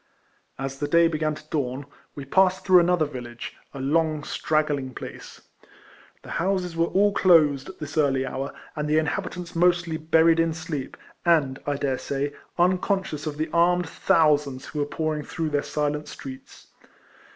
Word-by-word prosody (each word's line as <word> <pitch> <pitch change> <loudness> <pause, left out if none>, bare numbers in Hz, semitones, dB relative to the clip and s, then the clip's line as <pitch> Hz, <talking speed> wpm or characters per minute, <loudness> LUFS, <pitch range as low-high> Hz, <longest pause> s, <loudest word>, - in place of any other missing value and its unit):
As 135 0 -5
the 145 - -1
day 170 +2 +5
began 155 -1 -1
to 150 - -13
dawn, 135 -2 -2 0.3
we 140 - -7
passed 185 +5 +2
through 185 -2 +7
another 175 -2 +3
village 120 -4 -8
— - - -41
a - - -6
long, 155 +2 +1
straggling 145 -5 -1
place. - - -9 0.8
The - - -10
houses 185 -2 -1
were 165 0 +2
all 200 +3 +3
closed 150 -7 +4
at 190 - -11
this 150 0 -4
early 135 -3 +2
hour, 135 +2 -4 0.2
and 150 0 -2
the 155 - +3
inhabitants 175 +2 -2
mostly 175 -1 +2
buried 160 +1 +4
in 165 -1 +1
sleep, 160 -4 -5 0.3
and, 150 -6 +2
I 145 - +1
dare 140 -2 -1
say, 140 +1 -3 0.2
uncon 180 +1 +3 0.3
scious 150 0 -6
of 150 -1 -4
the 155 0 -2
armed 175 +1 +3
thousands 150 -5 +2
who 150 - -6
were 145 - +1
pouring 155 0 -2
through 165 +1 -3
their 145 -1 +1
silent 150 0 -2
streets. 130 -1 -10
155 Hz, 170 wpm, -25 LUFS, 140-170 Hz, 0.8 s, through